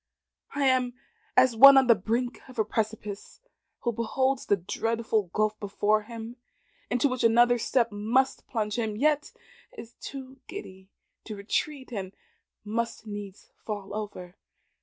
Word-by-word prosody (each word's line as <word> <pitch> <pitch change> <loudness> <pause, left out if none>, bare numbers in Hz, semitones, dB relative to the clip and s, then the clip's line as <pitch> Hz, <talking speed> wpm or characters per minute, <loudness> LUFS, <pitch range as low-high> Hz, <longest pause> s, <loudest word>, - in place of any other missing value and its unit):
I 280 -1 +1
am 255 -2 +2 0.4
as 255 -2 +5
one 275 +4 +10
on 265 - +6
the 240 - +7
brink 230 +5 -2
of 255 - -13
a 220 - +2
precipice, 210 -2 -4 0.4
who 240 - 0
beholds 260 +4 -1
the 205 - +3
dreadful 220 +2 -1
gulf 215 +1 0
before 205 +1 +1
him, 230 +2 -8 0.5
into 245 +3 +2
which 255 -2 -2
another 240 +1 +5
step 235 0 +1
must 230 +6 0
plunge 215 -1 -2
him, 220 -2 -1
yet 295 +3 +1 0.5
is 235 - -10
too 265 -1 -8
giddy 190 - -9 0.4
to 215 - -6
retreat, 260 +7 -3
and 195 -4 -5 0.5
must 230 +1 -3
needs 205 -2 -8
fall 205 -2 -5
over. 205 -4 -6
230 Hz, 140 wpm, -27 LUFS, 210-255 Hz, 0.5 s, one